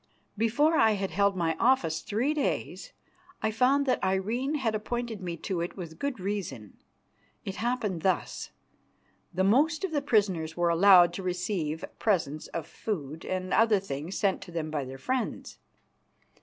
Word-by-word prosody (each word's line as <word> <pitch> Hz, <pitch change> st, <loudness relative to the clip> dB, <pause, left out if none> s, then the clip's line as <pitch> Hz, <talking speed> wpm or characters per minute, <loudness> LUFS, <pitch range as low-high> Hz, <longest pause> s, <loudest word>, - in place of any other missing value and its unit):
Before 240 Hz, +9 st, +2 dB
I 220 Hz, -, +5 dB
had 195 Hz, -2 st, -2 dB
held 200 Hz, 0 st, +2 dB
my 165 Hz, -3 st, 0 dB
office 170 Hz, -11 st, +2 dB
three 240 Hz, +8 st, 0 dB
days 300 Hz, -, -2 dB, 0.5 s
I 220 Hz, -, +2 dB
found 260 Hz, +5 st, +3 dB
that 255 Hz, -, 0 dB
Irene 225 Hz, +10 st, 0 dB
had 245 Hz, -7 st, 0 dB
appointed 225 Hz, 0 st, -3 dB
me 175 Hz, -2 st, -4 dB
to 185 Hz, -4 st, -3 dB
it 170 Hz, -, -4 dB
with 165 Hz, -3 st, -8 dB
good 280 Hz, -5 st, -2 dB
reason. 185 Hz, -, -4 dB, 0.7 s
It 195 Hz, -, -5 dB
happened 225 Hz, -7 st, -1 dB
thus. 185 Hz, +2 st, -1 dB, 0.8 s
The 190 Hz, -, 0 dB
most 295 Hz, -, +3 dB
of 385 Hz, -, -1 dB
the 295 Hz, -2 st, 0 dB
prisoners 190 Hz, -, +1 dB
were 175 Hz, 0 st, +2 dB
allowed 175 Hz, 0 st, +7 dB
to -, -, -5 dB
receive 180 Hz, -3 st, -2 dB
presents 155 Hz, -8 st, 0 dB
of 165 Hz, -2 st, -5 dB
food 160 Hz, -7 st, -5 dB
and 185 Hz, 0 st, -2 dB
other 220 Hz, -3 st, +4 dB
things 165 Hz, -1 st, -5 dB
sent 195 Hz, -2 st, +1 dB
to 175 Hz, -, -10 dB
them 160 Hz, -2 st, -3 dB
by 145 Hz, -3 st, -2 dB
their 130 Hz, +1 st, -8 dB
friends. 255 Hz, -, -3 dB
195 Hz, 160 wpm, -28 LUFS, 170-235 Hz, 0.8 s, allowed